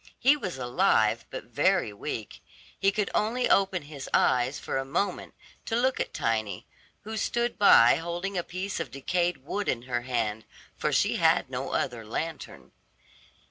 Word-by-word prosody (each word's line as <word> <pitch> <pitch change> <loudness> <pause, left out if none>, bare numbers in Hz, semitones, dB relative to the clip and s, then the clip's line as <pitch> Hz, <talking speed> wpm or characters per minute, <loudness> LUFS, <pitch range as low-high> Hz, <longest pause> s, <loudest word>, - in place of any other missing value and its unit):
He 270 +4 +5
was 190 - -5
alive 125 -1 +2
but - - -6
very 105 - +1
weak; 105 +1 -6 0.4
he 195 - +3
could 210 0 -1
only 235 +4 +1
open 190 -4 +2
his 145 -2 -8
eyes 125 +3 +2
for - - -3
a - - -2
moment 140 +9 -2 0.3
to 225 - -1
look 255 +2 +1
at - - -2
Tiny, 110 -3 -2 0.4
who 220 +1 -6
stood 235 +2 -1
by 120 - +7
holding 175 +4 -4
a 180 - +1
piece 185 +3 -4
of 165 - -4
decayed 170 +1 -1
wood 205 +6 -2
in 120 -1 -1
her 120 -1 -2
hand, 115 -3 -2 0.3
for - - -1
she - - +2
had - - +3
no - - -3
other 120 -3 -1
lantern. 155 +9 -6
165 Hz, 165 wpm, -27 LUFS, 120-200 Hz, 0.4 s, by